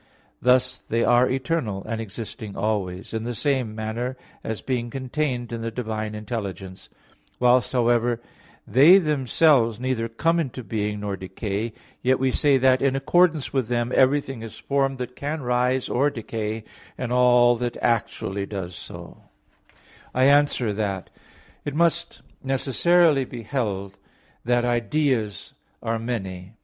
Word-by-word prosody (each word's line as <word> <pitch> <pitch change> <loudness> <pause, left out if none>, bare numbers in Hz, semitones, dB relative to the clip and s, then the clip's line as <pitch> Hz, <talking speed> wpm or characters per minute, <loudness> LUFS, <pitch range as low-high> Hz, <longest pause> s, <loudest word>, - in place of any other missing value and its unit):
Thus 130 0 +3
they 115 +1 -1
are 120 +1 +4
eternal, 130 -7 -1
and 115 0 -4
existing 110 0 -7
always 100 -3 -2
in 110 0 -2
the 120 +1 -4
same 130 -5 -1
manner, 115 +4 -3 0.3
as 110 -1 -3
being 120 -2 -2
contained 130 -2 -3
in 115 - -4
the 115 - -2
divine 110 -2 -4
intelligence. 100 -4 -6 0.5
Whilst, 125 0 +4
however, 120 -1 +2 0.5
they 145 - +7
themselves 140 - +3
neither 125 -3 -1
come 165 +9 +1
into 130 -5 -3
being 105 0 -2
nor 100 -1 -3
decay, 100 +4 -4 0.3
yet 130 +1 +3
we 130 0 +1
say 140 +1 +3
that 130 0 +4
in 135 -1 +2
accordance 160 +2 +2
with 130 -4 0
them 120 0 -1
everything 135 -2 +2
is 115 -1 -8
formed 135 -1 0
that 125 0 -6
can 145 +1 -4
rise 125 +1 +1
or 140 +4 +2
decay, 110 -3 -4 0.3
and 125 -2 -4
all 125 -1 +5
that 120 0 -3
actually 100 -3 -1
does 95 -3 -5
so." - - -10 1.0
I 130 - +3
answer 140 -5 +4
that, 100 -3 -3 0.5
It 145 - -4
must 170 +1 0 0.2
necessarily 140 +3 +3
be 120 -2 -8
held 100 -6 -3 0.5
that 120 0 +2
ideas 120 -2 0 0.3
are 115 0 -1
many. 95 -5 -5
120 Hz, 140 wpm, -24 LUFS, 110-135 Hz, 1.0 s, they